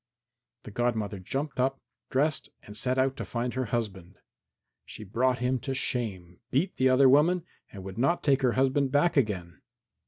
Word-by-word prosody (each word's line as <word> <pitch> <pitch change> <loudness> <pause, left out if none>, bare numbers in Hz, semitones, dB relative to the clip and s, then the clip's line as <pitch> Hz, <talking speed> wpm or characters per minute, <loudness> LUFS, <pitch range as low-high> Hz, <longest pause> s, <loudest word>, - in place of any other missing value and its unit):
The - - -9
godmother 110 -3 -1
jumped 135 +9 -4
up, 135 +1 +1 0.3
dressed 150 +4 0
and 105 - -11
set 125 +4 -1
out 135 0 +2
to - - -4
find 120 +1 -3
her 130 0 -1
husband. 100 -5 -4 0.7
She - - -10
brought 125 +5 +1
him 125 +1 0
to 135 +2 -4
shame, 95 -10 -3
beat 170 +9 0
the 130 0 +4
other 130 +1 +6
woman 160 +6 +4 0.3
and 95 -2 -9
would 95 +3 -7
not 170 +8 +1
take 135 -2 +3
her 125 -3 +2
husband 135 +1 +2
back 145 +5 +3
again. 95 - -1
130 Hz, 175 wpm, -28 LUFS, 105-135 Hz, 0.7 s, other